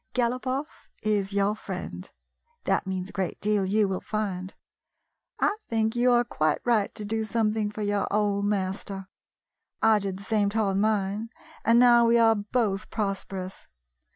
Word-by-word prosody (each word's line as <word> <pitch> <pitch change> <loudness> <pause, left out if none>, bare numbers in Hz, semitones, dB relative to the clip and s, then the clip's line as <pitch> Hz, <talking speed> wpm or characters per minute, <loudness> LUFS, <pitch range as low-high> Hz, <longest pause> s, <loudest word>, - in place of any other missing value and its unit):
Galopoff 255 +4 -2
is 205 -2 0
your 200 +1 +2
friend. - - -6 0.5
That - - 0
means 190 0 -3
a - - -26
great 190 -3 -2
deal, 210 -1 +1
you 205 +2 +2
will 190 -1 -2
find. 190 -3 -3 0.8
I 415 - +2
think 220 0 0
you 245 +1 +3
are 240 0 +4
quite 155 -10 0
right 225 -4 +2
to 210 - -5
do 220 +1 -1
something 215 -1 0
for 210 0 -5
your 205 0 0
old 205 -1 +1
master. 195 -1 -2 0.7
I 220 -1 +4
did 195 -2 -3
the 200 - -10
same 205 -1 +1
toward 200 -2 0
mine, 210 +1 0 0.3
and 230 +1 +4
now 240 -1 +6
we 235 +1 +5
are 225 -1 +6
both 210 -1 -1
prosperous. 195 -3 -4
210 Hz, 155 wpm, -27 LUFS, 195-225 Hz, 0.8 s, now